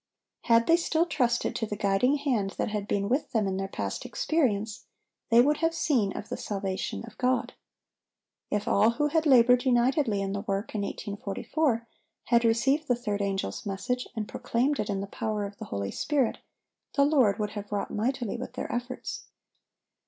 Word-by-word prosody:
Had 230 -1 +5
they 330 - +5
still 335 -1 +1
trusted 250 -8 0
to 225 - -2
the 210 - -3
guiding 205 +6 +2
hand 245 -9 -1
that - - -1
had 210 -1 -3
been 200 -1 0
with 265 +7 -1
them 220 -3 +2
in 190 -1 -1
their 195 0 -2
past - - -4
experience, 225 -9 -1 0.4
they 235 0 +7
would 295 +4 +3
have 330 +1 0
seen 255 -11 +1
of 210 - -7
the - - -3
salvation 195 -1 -3
of 230 - -14
God. 250 -1 +1 1.0
If 210 0 -1
all 210 +3 +4
who 295 0 +2
had 320 +1 +1
labored 250 -2 +6
unitedly 250 -3 +2
in 195 0 -2
the 200 - -2
work 200 +2 -3
in 210 - -1
1844, 225 +6 -2 0.4
had 235 -1 +3
received 270 +7 +2
the 245 - +3
third 210 -4 -2
angel's 195 - -2
message 245 +6 -2
and 215 -2 -3
proclaimed 265 +5 0
it 215 - -1
in 195 -1 -1
the - - -3
power 210 0 -3
of 200 0 -8
the - - -6
Holy 100 0 -3
Spirit, 280 -5 0 0.6
the 280 - +5
Lord 260 -9 +4
would 210 -2 -2
have 205 -1 -7
wrought 205 -1 -2
mightily 240 +1 -1
with 250 - -6
their - - -4
efforts. 245 +1 -4
230 Hz, 185 wpm, -28 LUFS, 200-260 Hz, 1.0 s, they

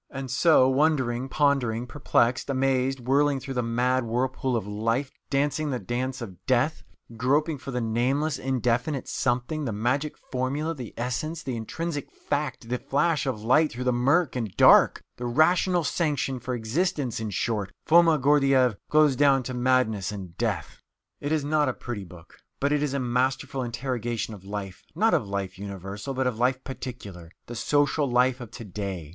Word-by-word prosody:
And 135 -2 -6
so, 130 0 +5
wondering, 130 -3 +1
pondering, 130 -6 +1
perplexed, 125 -1 +1
amazed, 135 -1 +1
whirling 140 +3 +2
through 135 +1 -6
the 125 - 0
mad 125 +2 +1
whirlpool 125 +2 -1
of 115 - -1
life, 115 +6 -1 0.2
dancing 145 +2 0
the 130 - -1
dance 125 +1 -3
of 95 -7 -10
death, 130 +5 +2 0.4
groping 145 +5 +1
for 135 - -8
the 125 -2 -2
nameless, 130 +7 0
indefinite 130 +2 -1
something, 130 +5 -1
the 120 - -2
magic 125 +8 -1
formula, 140 +5 -1
the 125 -7 -8
essence, 150 +7 -3
the 130 - -3
intrinsic 145 +7 -4
fact, 145 -5 -3
the 125 0 -1
flash 150 +1 0
of 110 -5 -3
light 150 +7 +4
through 125 +2 -5
the 125 0 +2
murk 140 +6 +2
and 110 -7 -4
dark - - +6
the 120 - -4
rational 175 +7 +3
sanction 145 -4 -1
for 125 +1 -3
existence, 125 - -1
in 110 -1 -3
short 105 0 -2
Foma 165 -1 +6
Gordyeeff 135 -4 +3
goes 150 -3 +4
down 135 -1 +4
to 130 - -5
madness 125 -6 +1
and 95 -4 -8
death. 100 -10 -3 0.4
It 145 - -3
is 155 -2 +1
not 150 -2 +2
a - - -1
pretty 115 -6 -6
book, 85 -2 -15 0.2
but 140 +1 +1
it 150 -1 +2
is 145 -2 -1
a - - 0
masterful 130 +2 -1
interrogation 120 -2 -3
of 100 -3 -11
life 100 -2 -6
not - - +3
of - - +1
life 95 -1 -4
universal, 100 +6 -6
but 130 0 0
of 120 -3 -1
life 130 +1 +1
particular, 115 -10 -8 0.2
the 120 - -8
social 145 +3 +1
life 125 +1 +2
of 120 - -8
to 115 +1 -9
day. 95 -5 -5
130 Hz, 175 wpm, -26 LUFS, 115-140 Hz, 0.4 s, dark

